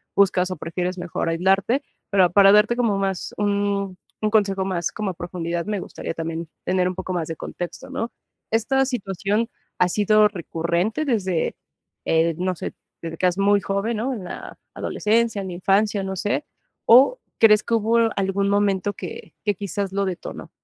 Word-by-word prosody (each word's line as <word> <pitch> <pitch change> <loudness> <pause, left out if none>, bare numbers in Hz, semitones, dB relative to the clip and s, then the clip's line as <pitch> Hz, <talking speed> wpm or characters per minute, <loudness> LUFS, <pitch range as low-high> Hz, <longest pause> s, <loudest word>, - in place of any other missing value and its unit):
buscas 185 -2 +3
o - - -2
prefieres 180 +2 -3
mejor 175 -1 -3
aislarte. 190 +9 +2 0.3
Pero 190 -3 +4
para 195 +1 +7
darte 210 +3 +4
como 230 -5 +2
más 195 -2 -2
un 200 -2 0 0.2
un 215 - +2
consejo 195 -3 +2
más 180 -3 -2
como 210 -2 -2
a - - -8
profundidad, 170 -1 -4
me 210 -2 -2
gustaría - - -6
también 165 0 -4 0.2
tener 180 0 +1
un 185 - -3
poco 185 0 -5
más 170 -3 -1
de 165 - -4
contexto, 175 +2 -7
¿no? 230 - -3 0.4
¿Esta 265 +5 +2
situación 210 -1 -1 0.3
ha 180 - +4
sido 210 +2 +4
recurrente 175 - -1
desde, 190 - 0 0.5
eh, 165 0 +2
no 185 +1 -1
sé, - - -5 0.3
desde 165 0 -6
que 185 - 0
eras 180 0 +2
muy 200 +1 +4
joven, 200 +4 -1
¿no?, 250 +5 -1
en 215 -6 -6
la 180 - -8 0.2
adolescencia, 225 -1 0
en 190 - -5
la - - -5
infancia, 200 +3 +2
no 190 0 -3
sé, 205 +9 -1 0.4
o 265 - +7 0.2
crees 210 -2 +7
que 230 - 0
hubo 225 +1 +2 0.2
algún 195 0 0
momento 200 -1 +1
que - - -8
que 205 - +3
quizás 200 0 -3
lo 200 +1 0
detonó? 185 -2 -6
195 Hz, 175 wpm, -23 LUFS, 180-210 Hz, 0.5 s, para